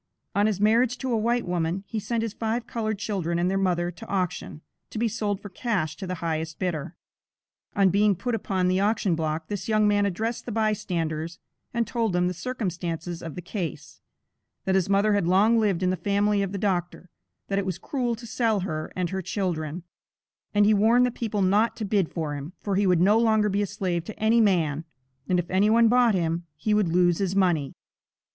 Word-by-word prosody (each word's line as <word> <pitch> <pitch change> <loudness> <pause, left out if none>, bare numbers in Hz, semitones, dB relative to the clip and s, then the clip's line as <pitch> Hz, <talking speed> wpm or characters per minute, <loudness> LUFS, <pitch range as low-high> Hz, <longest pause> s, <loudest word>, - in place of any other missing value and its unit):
On 205 +1 +3
his 205 -3 -1
marriage 230 +4 +3
to 255 +1 -3
a - - +2
white 235 +2 +1
woman, 175 +1 -1
he 220 - -4
sent 225 +2 -2
his 225 -2 -3
five 230 +1 -2
colored 220 -2 -2
children 190 -5 -2
and 175 +2 +1
their - - 0
mother 175 -2 0
to 220 +6 -12
auction, 180 -5 -3 0.3
to - - -7
be 230 +2 +1
sold 210 -3 -2
for 205 - -9
cash 180 -6 -2
to 190 - -6
the 185 - -3
highest 160 0 -2
bidder. 170 -3 -3 0.8
On 195 -3 +4
being 200 +1 +3
put 245 +7 -3
upon 190 -4 0
the 185 +1 +2
auction 205 -2 +1
block, 160 0 -2
this 205 -2 -4
young 215 -1 +3
man 205 -1 +3
addressed 220 +7 -3
the - - -3
bystanders, 175 -7 -1 0.3
and 235 -1 0
told 225 -3 -1
them 180 0 +2
the 180 - -1
circumstances 175 -7 -4
of 165 -3 -7
the 180 - -7
case; 175 - -6 0.6
that 190 - +1
his 190 0 +2
mother 200 +2 +3
had 200 -4 +1
long 210 +6 +4
lived 195 -5 +1
in 185 - +2
the - - 0
family 205 +1 +1
of 195 -1 -2
the 200 - -3
doctor, 180 -3 -2 0.4
that 195 0 0
it 200 - -2
was 185 -2 -2
cruel 245 +3 -2
to 235 +1 -11
sell 220 -2 0
her 155 -4 -4
and 180 -2 -2
her 190 0 -2
children, 175 -4 -3 0.7
and 205 0 +4
he 215 - +5
warned 225 +4 +4
the 250 - 0
people 215 -4 -2
not 205 +5 +3
to 220 - -4
bid 195 -4 +1
for 155 -3 -3
him, 145 +4 -6
for 200 -2 -2
he 200 0 +2
would 180 -2 +3
no 205 +5 +5
longer 220 -2 +3
be 200 +1 0
a 205 - 0
slave 185 -4 -2
to 215 - -9
any 225 +2 +4
man, 165 -7 +2 0.5
and 180 - +3
if 175 -1 -1
any 195 +3 +3
one 230 +1 +5
bought 240 -3 +4
him, 170 -1 -1
he 210 +8 -1
would 210 -3 +3
lose 175 0 +3
his 195 -1 -1
money. 175 -8 +2
195 Hz, 215 wpm, -26 LUFS, 175-215 Hz, 0.8 s, he